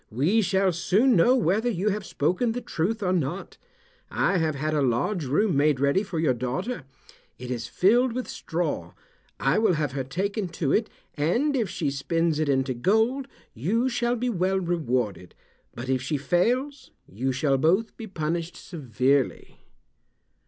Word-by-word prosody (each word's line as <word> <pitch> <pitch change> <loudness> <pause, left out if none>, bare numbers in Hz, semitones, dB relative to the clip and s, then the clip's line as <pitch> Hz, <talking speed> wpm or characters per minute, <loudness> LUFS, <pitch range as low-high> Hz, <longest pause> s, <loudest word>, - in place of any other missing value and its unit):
"We 155 - +2
shall 190 -1 +2
soon 210 +9 +3
know 235 +9 +5
whether 220 +1 +1
you 205 -1 0
have 205 -1 -3
spoken 185 - 0
the 245 - -4
truth 210 +5 -2
or 185 -1 +1
not. 175 +2 -3 0.5
I 190 - +1
have 160 -2 0
had 155 +3 -2
a 150 - +1
large 140 - 0
room 160 +7 +1
made 145 -1 +3
ready 140 +7 +2
for 195 -5 -5
your 155 -5 +2
daughter. 130 - -3 0.5
It 125 0 -7
is 120 -2 -3
filled 230 - +3
with 255 +1 -3
straw. 150 - -3 0.5
I 135 +9 +2
will 220 -4 +3
have 150 -4 -1
her 135 0 -3
taken 195 - -2
to 140 -5 0
it, 220 0 +1 0.2
and 235 - +1
if 230 -7 0
she 150 -5 -2
spins 160 +3 0
it 155 -2 0
into 135 -1 +1
gold 220 - +1 0.3
you 220 - 0
shall 240 0 0
be 245 +1 -2
well 190 -1 +1
rewarded, 125 - -2 0.4
but 120 +2 -6
if 130 -1 0
she 145 +3 -1
fails 245 - 0 0.2
you 125 +8 -2
shall 135 +1 +1
both 190 +10 +2
be 225 - -8
punished 165 -2 -3
severely." 135 - -1
170 Hz, 165 wpm, -26 LUFS, 135-215 Hz, 0.5 s, know